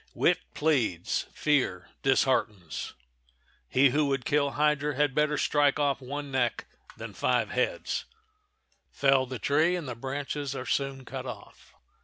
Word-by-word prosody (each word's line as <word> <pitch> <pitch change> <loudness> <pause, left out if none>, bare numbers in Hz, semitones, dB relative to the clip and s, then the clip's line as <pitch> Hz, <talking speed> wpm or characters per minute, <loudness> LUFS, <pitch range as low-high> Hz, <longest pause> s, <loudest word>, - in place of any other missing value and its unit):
Wit - - +3 0.2
pleads; 125 - 0
fear 130 - 0
disheartens. 110 - 0 0.7
He 135 0 +4
who 150 +2 +2
would 135 -2 -1
kill 145 -1 +2
hydra 150 -1 +1
had 145 -1 +2
better 150 +1 +2
strike 145 -2 +2
off 140 -2 +1
one 140 +2 -5
neck 125 -3 0 0.3
than - - -7
five - - +1
heads,—fell 425 - -2
the 130 0 -5
tree 155 +9 +2
and 170 -5 -4
the 125 - -3
branches 140 +3 -4
are 130 - -5
soon 135 -1 -2
cut - - -6
off. - - -11
140 Hz, 135 wpm, -28 LUFS, 130-150 Hz, 0.7 s, He